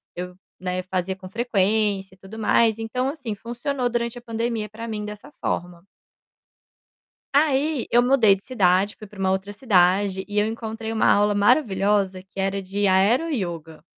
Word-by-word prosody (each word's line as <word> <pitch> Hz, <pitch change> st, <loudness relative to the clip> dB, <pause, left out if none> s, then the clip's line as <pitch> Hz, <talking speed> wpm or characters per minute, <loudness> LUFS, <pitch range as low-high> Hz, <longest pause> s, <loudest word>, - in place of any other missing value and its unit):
eu, 180 Hz, 0 st, -6 dB, 0.2 s
né, 185 Hz, 0 st, -3 dB
fazia 185 Hz, 0 st, -2 dB
com 185 Hz, 0 st, -11 dB
frequência 205 Hz, -2 st, 0 dB
e -, -, -19 dB
tudo 195 Hz, +3 st, -11 dB
mais, 225 Hz, 0 st, +3 dB
então 250 Hz, +4 st, -2 dB
assim, 275 Hz, -7 st, -5 dB
funcionou 245 Hz, +4 st, -3 dB
durante 235 Hz, 0 st, -2 dB
a -, -, -18 dB
pandemia 230 Hz, -2 st, -3 dB
pra 230 Hz, +3 st, -8 dB
mim 215 Hz, -2 st, -4 dB
dessa 210 Hz, +6 st, -9 dB
forma. 175 Hz, 0 st, -3 dB, 1.5 s
Aí 290 Hz, -2 st, +2 dB
eu 240 Hz, +1 st, +5 dB
mudei 245 Hz, -6 st, +5 dB
de 195 Hz, -, -13 dB
cidade, 200 Hz, -4 st, +2 dB
fui 215 Hz, -, -11 dB
pra 205 Hz, -, -16 dB
uma 190 Hz, -1 st, +1 dB
outra 190 Hz, +1 st, -2 dB
cidade 190 Hz, -3 st, +2 dB
e 205 Hz, 0 st, -5 dB
eu 210 Hz, -, +4 dB
encontrei 225 Hz, 0 st, -4 dB
uma 220 Hz, -, +2 dB
aula 205 Hz, 0 st, +3 dB
maravilhosa 200 Hz, -4 st, +2 dB
que 190 Hz, +1 st, -12 dB
era 195 Hz, +1 st, -1 dB
de 195 Hz, +2 st, -2 dB
aero 200 Hz, -, +3 dB
ioga. 165 Hz, -, -5 dB
210 Hz, 165 wpm, -23 LUFS, 190-235 Hz, 1.5 s, eu